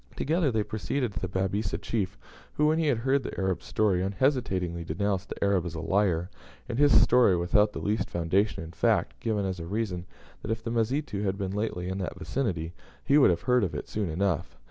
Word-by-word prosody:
Together, 160 -1 +1
they 110 -2 +1
proceeded 110 +2 -2
to 80 - -4
the 95 - -3
Babisa 95 -1 -1
chief, 105 -2 -2 0.4
who, 150 - +2
when 155 +1 +3
he 160 - +1
had 135 -5 +2
heard 135 +4 +1
the - - -6
Arab's 95 -1 -1
story, 100 -4 +2
unhesitatingly 95 - 0
denounced 100 +4 -2
the - - -4
Arab 100 -3 +2
as 85 -1 -6
a - - -4
liar, 90 -1 +1 0.4
and 120 +1 -3
his 145 -7 +6
story 120 -5 +5
without 105 +5 +3
the - - -7
least 105 +2 -1
foundation 85 +3 0
in 80 - -9
fact; - - +1
giving 105 -3 -1
as 95 -1 -3
a 85 - -6
reason 95 -3 -3 0.3
that, - - -7
if 115 0 -2
the 115 - -3
Mazitu 115 -1 -1
had 100 -1 -1
been 95 -2 -3
lately 100 -3 -2
in 95 +1 -3
that 90 -1 -4
vicinity, 90 -5 -2 0.3
he 140 - +1
should 145 -2 +7
have 85 -1 +1
heard 125 -2 +3
of 85 -6 -2
it 75 - -5
soon 105 -4 -2
enough. 85 0 -1
100 Hz, 215 wpm, -28 LUFS, 90-115 Hz, 0.4 s, should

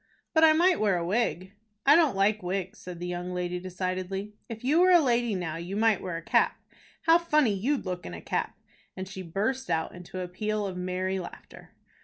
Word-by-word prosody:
"But 320 -1 +4
I 315 -1 +8
might 350 +3 +3
wear 200 -4 +2
a 170 - -2
wig." 190 -2 -1 0.3
"I 285 +2 +8
don't 320 - +4
like 205 +2 +2
wigs," 185 +1 -3
said 180 -2 -8
the 175 - -4
young 180 0 -4
lady, 180 0 -2
decidedly. 185 +2 -4 0.2
"If 225 0 -7
you 295 +6 +3
were 365 - +6
a 355 -1 +8
lady 240 -6 +1
now, 165 -3 -3
you 175 +4 -5
might 220 -1 +3
wear 180 -3 -4
a 165 - -8
cap. - - +2 0.4
How 330 0 +6
funny 305 -9 +2
you'd 250 +8 -1
look 180 -1 -4
in 85 - -7
a - - -7
cap!" - - -3 0.4
and 185 0 -5
she 190 -1 -7
burst 215 +10 -2
out 160 - -1
into 180 +1 -8
a 180 - -4
peal 210 +3 -2
of 190 -2 -4
merry 185 +1 -2
laughter. 175 - -11
190 Hz, 215 wpm, -28 LUFS, 180-240 Hz, 0.4 s, I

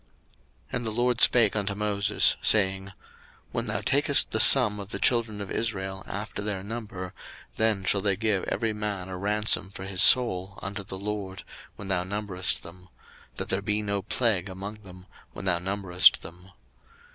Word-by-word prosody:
02:030:011 - - -4
And 120 - -6
the - - 0
LORD 120 +1 0
spake 115 -5 +5
unto 100 -1 -2
Moses, 105 -1 +1
saying, 95 -2 +2
02:030:012 100 - -13 0.6
When 115 +1 -4
thou 105 -1 -3
takest 140 +5 +2
the 110 - -1
sum 110 -4 +8
of 100 -1 -9
the - - -4
children 115 -4 0
of 100 - -7
Israel 95 -4 -3
after 100 +1 -6
their 100 -2 -4
number, 100 -4 -8 0.4
then 110 -3 0
shall 100 +1 0
they 100 -1 0
give 105 -1 -1
every 115 -2 -2
man 105 -3 -5
a 90 - -7
ransom 105 0 -1
for 95 -1 -10
his 95 -1 +1
soul 100 -6 +5
unto 100 +1 -6
the 95 0 -8
LORD, 100 -1 -6 0.3
when 100 - -9
thou 90 -2 -1
numberest 95 -1 -2
them; 90 +1 -13 0.5
that - - -6
there 95 - -1
be 105 +1 -2
no 100 -1 -2
plague 105 -3 -1
among 100 +3 -9
them, 90 -2 -14 0.3
when - - -9
thou 90 -2 0
numberest 95 -1 +2
them. 90 +3 -11
100 Hz, 180 wpm, -25 LUFS, 95-105 Hz, 0.6 s, sum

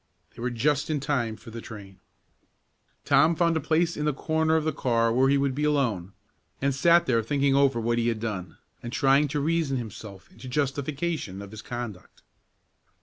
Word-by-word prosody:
They - - -10
were 125 - -1
just 140 +5 0
in 155 -2 0
time 130 -5 -1
for 115 - -13
the 115 +1 -7
train. 100 -6 -11 1.1
Tom 160 +3 +4
found 170 0 +2
a - - +1
place 165 +3 +1
in 150 - -3
the 150 - +1
corner 160 +1 +1
of 160 - +2
the 155 -1 -1
car 115 -4 +1
where 130 +2 +3
he 140 - +4
would 140 -1 0
be 145 +3 -2
alone, 120 -11 0 0.5
and 140 0 +1
sat 170 +5 +4
there 115 -3 +2
thinking 140 +4 +1
over 140 -3 +3
what 120 +1 0
he 115 - 0
had 115 -2 0
done, 95 -7 -5 0.2
and 120 - -6
trying 140 +3 +3
to 145 +1 -2
reason 155 -2 0
himself 105 -5 -9
into 130 - -11
justification 140 - -2
of 100 0 -9
his 110 0 -8
conduct. 120 -6 -8
135 Hz, 195 wpm, -26 LUFS, 115-150 Hz, 1.1 s, Tom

